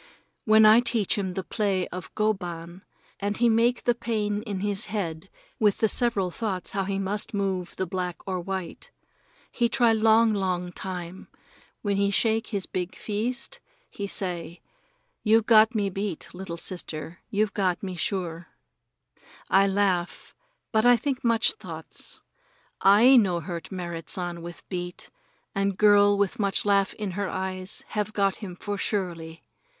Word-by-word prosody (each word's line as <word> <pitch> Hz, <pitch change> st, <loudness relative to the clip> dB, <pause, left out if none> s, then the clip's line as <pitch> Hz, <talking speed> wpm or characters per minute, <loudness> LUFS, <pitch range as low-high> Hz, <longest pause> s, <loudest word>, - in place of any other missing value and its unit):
Then 215 Hz, 0 st, +7 dB
I 215 Hz, +2 st, +8 dB
teach 235 Hz, -4 st, +1 dB
him 190 Hz, -3 st, -3 dB
the 190 Hz, -, -2 dB
play 190 Hz, +1 st, -1 dB
of 180 Hz, -1 st, -7 dB
go 215 Hz, 0 st, +2 dB
ban, 175 Hz, -1 st, -8 dB, 0.4 s
and 205 Hz, +1 st, -2 dB
he 240 Hz, 0 st, +4 dB
make 235 Hz, +2 st, +2 dB
the 240 Hz, -, +3 dB
pain 215 Hz, -3 st, -2 dB
in 205 Hz, -4 st, -4 dB
his 205 Hz, +1 st, -1 dB
head 185 Hz, -4 st, -4 dB, 0.3 s
with 210 Hz, -2 st, +3 dB
the 220 Hz, -, +3 dB
several 210 Hz, -6 st, +1 dB
thoughts 190 Hz, -3 st, -3 dB
how 195 Hz, -1 st, -1 dB
he 195 Hz, 0 st, -2 dB
must 200 Hz, +2 st, -1 dB
move 190 Hz, -3 st, -2 dB
the 190 Hz, -, -1 dB
black 180 Hz, 0 st, -3 dB
or 185 Hz, -1 st, -2 dB
white. 190 Hz, 0 st, -5 dB, 0.6 s
He 235 Hz, -1 st, +1 dB
try 240 Hz, -2 st, +4 dB
long, 220 Hz, 0 st, +4 dB
long 180 Hz, -3 st, -1 dB
time, 180 Hz, 0 st, -6 dB, 0.6 s
then 200 Hz, -2 st, 0 dB
he 200 Hz, 0 st, +2 dB
shake 225 Hz, +2 st, +2 dB
his 200 Hz, -3 st, -3 dB
big 180 Hz, -1 st, -4 dB
feest, 245 Hz, -, -3 dB, 0.3 s
and -, -, -24 dB
he 200 Hz, -, -3 dB
say: 175 Hz, -3 st, -3 dB, 0.6 s
"You've 220 Hz, 0 st, +4 dB
got 220 Hz, +1 st, +6 dB
me 200 Hz, -2 st, 0 dB
beat, 195 Hz, -3 st, -4 dB
little 180 Hz, -2 st, -6 dB
sister; 170 Hz, -1 st, -6 dB
you've 215 Hz, -2 st, 0 dB
got 185 Hz, -3 st, 0 dB
me 185 Hz, -2 st, -4 dB
sure." 175 Hz, -2 st, -2 dB, 1.0 s
I 195 Hz, +1 st, +5 dB
laugh, 190 Hz, -3 st, 0 dB, 0.4 s
but 220 Hz, -1 st, +3 dB
I 245 Hz, 0 st, +6 dB
think 270 Hz, +2 st, -3 dB
much 230 Hz, -2 st, +3 dB
thoughts. 445 Hz, -, -7 dB, 0.6 s
I 225 Hz, +7 st, +7 dB
no 185 Hz, -7 st, +3 dB
hurt 170 Hz, 0 st, -6 dB
Merrit 170 Hz, -3 st, -5 dB
San 175 Hz, -2 st, -3 dB
with 170 Hz, +1 st, -9 dB
beat, 175 Hz, -1 st, -6 dB, 0.4 s
and 195 Hz, -1 st, 0 dB
girl 205 Hz, -1 st, +5 dB
with 200 Hz, 0 st, 0 dB
much 200 Hz, -1 st, +1 dB
laugh 200 Hz, -1 st, +2 dB
in 210 Hz, -3 st, -4 dB
her 195 Hz, +1 st, -2 dB
eyes 185 Hz, 0 st, -3 dB
have 210 Hz, 0 st, -2 dB
got 195 Hz, -2 st, +1 dB
him 185 Hz, -5 st, -7 dB
for 205 Hz, +2 st, -4 dB
surely. 170 Hz, -6 st, -3 dB
195 Hz, 160 wpm, -26 LUFS, 180-215 Hz, 1.0 s, I